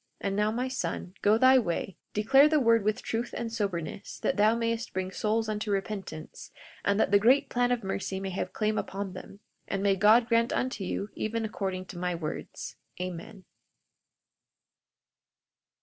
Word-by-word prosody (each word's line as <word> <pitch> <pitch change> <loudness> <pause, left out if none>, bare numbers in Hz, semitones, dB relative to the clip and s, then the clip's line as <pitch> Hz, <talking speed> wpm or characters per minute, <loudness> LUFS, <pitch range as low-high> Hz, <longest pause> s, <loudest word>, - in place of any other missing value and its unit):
And 195 -1 -2
now, 210 +1 +2
my 245 +4 -1
son, 250 -7 -4
go 210 +2 +4
thy 260 +2 +6
way, 190 -3 -2 0.2
declare 270 +8 +6
the 305 -1 +3
word 230 -4 +4
with 215 +4 0
truth 230 +2 -3
and 230 -1 -4
soberness, 195 -3 -3
that - - +1
thou 215 +2 +4
mayest 230 0 -2
bring 185 0 -2
souls 220 +2 0
unto 215 0 -3
repentance, 195 -5 -4 0.3
that 200 0 +2
the 200 - +6
great 250 +7 +4
plan 245 0 +1
of 245 -3 0
mercy 190 0 -3
may 195 0 -4
have 185 - -3
claim 215 0 0
upon 195 -1 -4
them. 195 +2 -10 0.3
And 195 0 -2
may 200 -1 +4
God 215 +5 +5
grant 230 0 +2
unto 250 -5 -1
you 200 +2 -3
even 225 +1 -2
according 190 -3 -3
to 175 -1 -9
my 180 0 -1
words. 155 -2 -6 0.2
Amen. 185 +2 -6
210 Hz, 165 wpm, -29 LUFS, 195-230 Hz, 0.3 s, thy